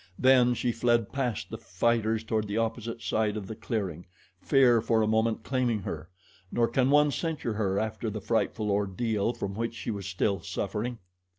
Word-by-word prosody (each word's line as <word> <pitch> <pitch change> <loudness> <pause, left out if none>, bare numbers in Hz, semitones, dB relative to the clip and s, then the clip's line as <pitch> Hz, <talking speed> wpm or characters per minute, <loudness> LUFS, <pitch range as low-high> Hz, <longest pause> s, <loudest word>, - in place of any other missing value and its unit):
Then 125 -2 +5
she 120 - 0
fled 115 -2 +1
past 125 -6 -2
the - - -5
fighters 110 +3 0
toward 110 -1 -1
the 100 +2 -2
opposite 115 0 -2
side 105 +3 0
of 105 - -5
the 110 - -6
clearing, 95 -7 -4 0.3
fear 125 -4 +5
for 115 -1 +2
a - - +1
moment 110 0 +1
claiming 120 -5 0
her. 80 -1 -5 0.4
Nor 120 -1 +2
can 130 0 +2
one 145 +1 +5
censure 155 -7 -2
her 100 -2 0
after 110 +1 -2
the 105 0 -4
frightful 110 0 0
ordeal 105 +2 0
from 100 -4 -4
which 115 +2 -3
she 115 - -4
was 100 -2 -5
still 100 +1 0
suffering. 115 +7 -3
110 Hz, 180 wpm, -28 LUFS, 105-120 Hz, 0.4 s, Then